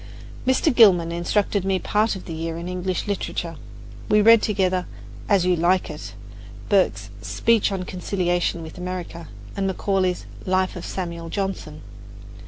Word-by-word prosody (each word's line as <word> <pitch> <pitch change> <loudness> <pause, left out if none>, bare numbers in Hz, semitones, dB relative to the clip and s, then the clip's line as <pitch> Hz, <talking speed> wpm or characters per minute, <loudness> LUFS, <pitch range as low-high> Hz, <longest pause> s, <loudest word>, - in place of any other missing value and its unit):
Mr. 260 +3 +3
Gilman 180 -8 +6
instructed 195 +3 0
me 190 0 +1
part 210 +3 +1
of 190 - -9
the 165 - -6
year 165 +1 -4
in 170 +1 -6
English 180 0 -2
literature. 180 -4 -3 0.5
We 210 - +5
read 225 +1 +7
together, 185 -3 0 0.4
"As 195 -4 +4
You 180 0 +3
Like 175 +1 +2
It," 105 -10 -8 0.5
Burke's 195 -2 +2
"Speech 230 -3 +2
on 190 -2 -2
Conciliation 175 -2 -1
with 160 +2 -10
America," 180 -2 -5 0.3
and 195 -1 0
Macaulay's 190 -1 0 0.2
"Life 185 0 +1
of 175 - -6
Samuel 170 -3 -5
Johnson." 190 -6 -4
185 Hz, 145 wpm, -23 LUFS, 170-195 Hz, 0.5 s, read